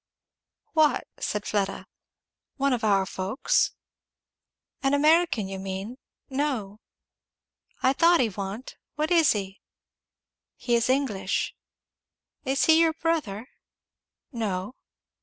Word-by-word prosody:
"What?" 310 -2 +3
said 210 0 -2
Fleda. 200 -2 -1 0.7
"One 275 -1 +1
of 240 - -2
our 200 -3 +3
folks?" 190 +7 0 1.1
"An 275 +1 +2
American, 305 - +3
you 190 0 -6
mean? 195 +5 -5 0.3
No." 260 -8 -2 1.0
"I 260 - +4
thought 335 +4 +5
he 245 - +3
wa'n't 200 +4 -6 0.2
What 305 +3 -1
is 330 -5 +5
he?" 195 -2 -5 0.9
"He 240 - -2
is 235 +1 +2
English." 225 -9 0 0.9
"Is 270 +1 +2
he 320 0 +6
your 325 -1 +3
brother?" 310 -10 -2 0.8
"No." 210 -3 -3
240 Hz, 105 wpm, -26 LUFS, 195-295 Hz, 1.1 s, he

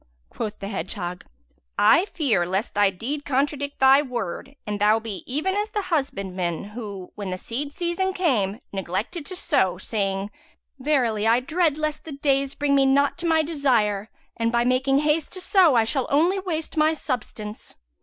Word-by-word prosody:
Quoth 215 -2 -5
the 195 - -6
hedgehog, 190 -3 -4 0.5
"I 335 - +5
fear 270 - +1
lest 190 +5 -1
thy 205 -1 +4
deed 255 +10 -4
contradict 285 +1 -1
thy 270 +1 +6
word 250 -2 -5
and 210 -1 -4
thou 215 +2 +5
be 220 -4 -5
even 310 +8 0
as 415 +1 -1
the 415 -1 -2
husbandman 190 - -1
who, 205 -3 -8
when 205 -2 -5
the 185 - -3
seed 280 +9 -5
season 355 +2 -1
came, 235 - 0
neglected 200 - -3
to 370 - -6
sow, 190 - +1
saying, 195 0 -2 0.5
Verily 245 -7 +1
I 230 +2 +5
dread 315 +3 +1
lest 305 -1 -2
the 315 - -7
days 275 -1 0
bring 290 -1 +1
me 275 -1 +4
not 280 +1 +3
to 345 - -2
my 320 -1 +3
desire 235 -10 +1 0.3
and 230 0 0
by 235 0 +2
making 260 +2 +2
hast 300 +1 +1
to 370 - -6
sow 360 -6 +4
I 230 - +5
shall 260 +3 0
only 340 +7 +3
waste 325 -4 -4
my 310 +1 +4
substance!' 220 -7 -5
265 Hz, 175 wpm, -24 LUFS, 210-305 Hz, 0.5 s, thy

